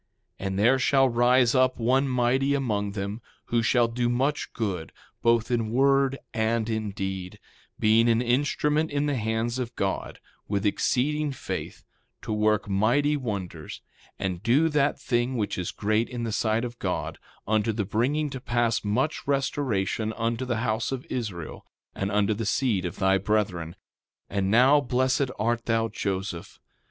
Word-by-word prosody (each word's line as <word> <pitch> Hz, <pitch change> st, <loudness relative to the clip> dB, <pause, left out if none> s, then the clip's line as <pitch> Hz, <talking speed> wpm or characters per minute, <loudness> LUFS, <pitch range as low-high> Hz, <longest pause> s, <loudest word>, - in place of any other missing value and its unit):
3:24 95 Hz, -, -3 dB
And 95 Hz, 0 st, -3 dB
there 120 Hz, +6 st, +4 dB
shall 135 Hz, +1 st, +4 dB
rise 120 Hz, +1 st, +4 dB
up 130 Hz, -1 st, +3 dB
one 130 Hz, +4 st, +2 dB
mighty 130 Hz, +2 st, +2 dB
among 105 Hz, -7 st, -1 dB
them, 100 Hz, +2 st, -4 dB, 0.3 s
who 120 Hz, -, +4 dB
shall 120 Hz, +1 st, +3 dB
do 120 Hz, +1 st, -1 dB
much 135 Hz, +5 st, 0 dB
good, 95 Hz, -, -3 dB, 0.3 s
both 115 Hz, 0 st, +2 dB
in 115 Hz, -2 st, 0 dB
word 135 Hz, +2 st, +3 dB, 0.2 s
and 110 Hz, 0 st, 0 dB
in 110 Hz, -1 st, -2 dB
deed, 95 Hz, -2 st, -5 dB, 0.4 s
being 110 Hz, +2 st, +4 dB
an 115 Hz, 0 st, +3 dB
instrument 145 Hz, +5 st, +1 dB
in 145 Hz, 0 st, 0 dB
the 145 Hz, -1 st, 0 dB
hands 115 Hz, +1 st, -1 dB
of 125 Hz, -2 st, -4 dB
God, 95 Hz, -1 st, -3 dB, 0.3 s
with 100 Hz, -1 st, -1 dB
exceeding 145 Hz, +8 st, +1 dB
faith, 135 Hz, -, -6 dB, 0.4 s
to -, -, -3 dB
work 105 Hz, -1 st, +1 dB
mighty 120 Hz, +10 st, +2 dB
wonders, 100 Hz, -, -5 dB, 0.3 s
and 90 Hz, -2 st, -3 dB
do 135 Hz, +9 st, +3 dB
that 150 Hz, -2 st, +1 dB
thing 125 Hz, -1 st, 0 dB
which 105 Hz, -3 st, -1 dB
is 90 Hz, -1 st, -3 dB
great 110 Hz, +2 st, 0 dB
in 120 Hz, -2 st, -4 dB
the 115 Hz, -, -2 dB
sight 110 Hz, +2 st, 0 dB
of 120 Hz, 0 st, -8 dB
God, -, -, -3 dB, 0.3 s
unto 110 Hz, +1 st, +2 dB
the 105 Hz, -2 st, -2 dB
bringing 140 Hz, +9 st, 0 dB
to 130 Hz, -, -6 dB
pass 120 Hz, -4 st, 0 dB
much 125 Hz, +11 st, -1 dB
restoration 120 Hz, -6 st, 0 dB
unto 115 Hz, +2 st, -2 dB
the 120 Hz, -3 st, -1 dB
house 110 Hz, +1 st, -1 dB
of 130 Hz, -1 st, -4 dB
Israel, 100 Hz, -10 st, -5 dB, 0.3 s
and 100 Hz, +1 st, -3 dB
unto 105 Hz, +1 st, +2 dB
the 110 Hz, 0 st, -3 dB
seed 105 Hz, -5 st, +1 dB
of 85 Hz, -, -4 dB
thy 95 Hz, 0 st, +2 dB
brethren. 95 Hz, -5 st, -1 dB, 0.6 s
3:25 100 Hz, -, -4 dB
And 95 Hz, 0 st, 0 dB
now, 130 Hz, +7 st, +5 dB
blessed 130 Hz, +1 st, +1 dB
art 115 Hz, +2 st, 0 dB
thou, 115 Hz, -1 st, +1 dB
Joseph. 95 Hz, -4 st, -4 dB
115 Hz, 165 wpm, -26 LUFS, 105-130 Hz, 0.6 s, now